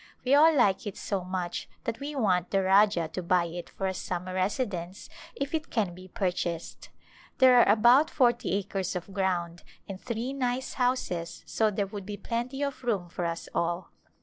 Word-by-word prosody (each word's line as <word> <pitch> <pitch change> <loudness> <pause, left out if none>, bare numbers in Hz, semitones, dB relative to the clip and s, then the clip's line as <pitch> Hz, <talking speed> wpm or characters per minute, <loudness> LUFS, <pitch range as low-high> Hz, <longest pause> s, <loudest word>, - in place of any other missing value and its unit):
We 260 - +3
all 310 +3 +7
like 205 -8 +2
it 200 - -6
so 195 -3 -2
much 180 -1 -4
that 230 -1 -3
we 290 +1 -5
want 185 -8 +1
the 195 -1 +1
Rajah 190 -3 +4
to 185 - -4
buy 175 0 +2
it 170 +1 -7
for 195 - -5
a 190 - 0
sum 180 -1 -4
mer 185 - -6
residence 185 -2 -2 0.3
if 275 +2 -4
it 320 0 -2
can 205 -7 0
be 185 +1 -12
purchased. 180 -4 -3 0.5
There 260 -1 +7
are 200 - +5
about 240 +8 +5
forty 240 - +2
acres 195 -1 -2
of 180 +2 -6
ground 175 -3 -1 0.3
and 195 -1 -7
three 240 +2 -3
nice 255 -1 -2
houses 245 -10 -1
so 220 -1 +1
there 205 -1 -1
would 200 -1 -8
be 205 -1 -5
plenty 250 +6 -3
of 275 -2 -4
room 200 -8 -1
for 175 +1 -3
us 170 0 -3
all. 170 +1 -1
195 Hz, 190 wpm, -28 LUFS, 180-245 Hz, 0.5 s, all